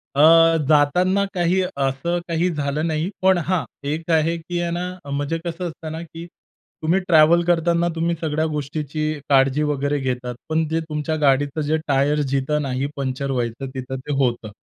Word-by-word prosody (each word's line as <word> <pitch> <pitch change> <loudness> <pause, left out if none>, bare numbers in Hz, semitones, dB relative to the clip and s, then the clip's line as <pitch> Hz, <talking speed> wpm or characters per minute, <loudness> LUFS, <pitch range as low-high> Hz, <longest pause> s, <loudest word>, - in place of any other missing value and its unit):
अ, 140 - +3 0.5
जाताना 180 +7 +3
काही 180 +1 +1
असं 140 +1 -1
काही 170 +1 +1
झालं 150 +2 -1
नाही. 160 +3 -1
पण 190 -1 +4
हां, 170 0 0 0.2
एक 160 +3 -3
आहे 165 +1 +2
की 175 +1 -4
आहे 170 0 -1
ना, 180 -2 -5
म्हणजे 145 +3 -2
कसं 175 +1 -3
असतं 160 -1 -7
ना, 160 +1 -5
की 165 0 -9 0.6
तुम्ही 170 +5 +2
ट्रॅव्हल 165 +1 +5
करताना 170 0 +2
तुम्ही 170 +1 0
सगळ्या 155 -1 0
गोष्टीची 150 +1 -3 0.2
काळजी 135 +1 +3
वगैरे 145 -1 0
घेतात. 125 -2 -3
पण 160 0 +1
जे 160 +1 0
तुमच्या 150 +1 -2
गाडीचं 145 +2 +2
जे 155 - +2
टायर 145 +2 +2
जिथं 140 +2 0
नाही 135 -1 -2
पंक्चर 135 0 -3
व्हायचं 120 +1 -3
तिथं 130 0 -5
ते 145 +2 -5
होतं. 120 -4 -1
155 Hz, 170 wpm, -21 LUFS, 140-170 Hz, 0.6 s, ट्रॅव्हल